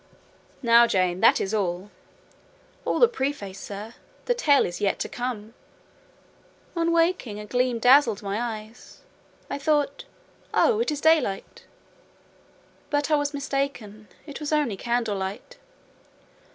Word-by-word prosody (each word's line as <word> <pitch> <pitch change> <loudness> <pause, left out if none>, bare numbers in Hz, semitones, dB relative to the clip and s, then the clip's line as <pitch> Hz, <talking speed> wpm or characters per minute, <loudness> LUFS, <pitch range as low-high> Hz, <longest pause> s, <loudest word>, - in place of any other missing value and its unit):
"Now, 235 0 +6
Jane, 185 -3 +1
that - - +5
is 195 - -2
all." 190 -1 -2 0.9
"All - - 0
the 480 - +6
preface, 265 - -4
sir; 210 +3 -8 0.3
the - - +2
tale 295 - +3
is 175 - -6
yet 200 -1 +1
to - - -1
come. 235 -3 -5 1.2
On 335 0 +1
waking, 330 - +1
a 210 - -7
gleam 250 +2 0
dazzled 245 -3 +4
my 200 +3 -2
eyes; 225 -1 -7 0.5
I - - -4
thought—Oh, 300 - -1
it 465 - 0
is 295 -1 -3
daylight! 315 -12 +1 1.2
But 290 +1 0
I - - +6
was 290 -1 0
mistaken; 275 -7 -4 0.2
it 290 -3 -8
was 300 -1 -4
only 295 -9 +1
candlelight. 225 - -3
245 Hz, 125 wpm, -25 LUFS, 210-290 Hz, 1.2 s, Now